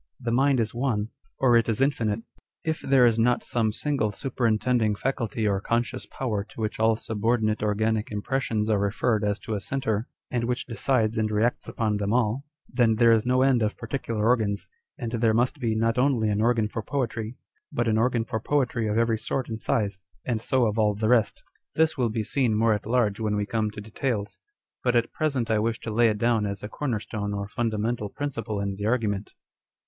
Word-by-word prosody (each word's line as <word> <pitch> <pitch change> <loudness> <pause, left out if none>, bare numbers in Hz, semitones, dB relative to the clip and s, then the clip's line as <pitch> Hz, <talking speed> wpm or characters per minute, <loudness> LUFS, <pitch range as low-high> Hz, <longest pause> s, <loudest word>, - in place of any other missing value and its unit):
The 120 - -2
mind 135 +2 +3
is 110 -2 -1
one, 115 -4 -1 0.3
or 125 -3 +4
it 115 0 +3
is 110 - 0
infinite. 115 -6 +1 0.4
If 160 0 -2
there 135 -2 +4
is 115 -1 +3
not 120 +2 +2
some 115 -3 0
single, 135 -2 -1
superin 115 0 0
tending 115 -4 +1
faculty 115 -2 -1
or 100 -1 +1
conscious 120 +3 -1
power 110 -6 -2
to 110 - -15
which 110 0 -2
all 110 0 +4
subordinate 110 0 0
organic 110 +1 0
impressions 110 0 -1
are 105 -2 +2
referred 105 +2 +1
as 105 0 +1
to 110 - -4
a 105 - -1
centre, 110 0 -2 0.2
and 120 -2 0
which 125 +1 -2
decides 115 -1 0
and 110 -1 +1
reacts 110 +3 0
upon 110 -2 0
them 100 +1 -1
all, 120 +2 +1 0.2
then 120 -3 +2
there 115 +1 +5
is 115 +1 +3
no 130 +1 +3
end 130 -3 +3
of 105 -1 0
particular 115 -3 -2
organs, 110 -4 +1 0.3
and 120 -3 -4
there 115 -2 +2
must 125 +5 +1
be 115 -4 0
not 115 +2 +1
only 125 -5 +2
an 105 0 +1
organ 115 -2 +2
for 110 +2 -4
poetry, 115 -2 -3 0.3
but 120 0 0
an 110 -1 +2
organ 120 -1 +1
for 110 -1 -2
poetry 125 -3 0
of 105 +1 0
every 115 -1 +2
sort 125 +3 -3
and 110 -1 -5
size, 100 -3 0 0.3
and 115 -3 -1
so 130 +1 +2
of 110 0 0
all 105 -1 +3
the 110 +1 0
rest. 120 -3 +2 0.3
This 160 0 +3
will 125 -4 +1
be 110 0 -2
seen 120 -2 +1
more 115 0 +4
at 105 0 -3
large 115 -4 +1
when 105 -2 0
we 105 0 0
come 110 0 -1
to 105 - -9
details; 105 0 -3 0.4
but 125 -1 +2
at 120 0 +1
present 135 -7 0
I 110 - +3
wish 115 +1 -1
to 110 - -4
lay 120 +1 +4
it 105 - -1
down 115 -1 +2
as 100 0 -5
a - - -3
corner 125 -6 -2
stone 105 -1 -4
or 100 0 -3
fundamental 110 -1 -1
principle 115 -7 -4
in 100 -1 -2
the 105 +1 -2
argument. 110 -4 -1
115 Hz, 210 wpm, -26 LUFS, 105-125 Hz, 0.4 s, there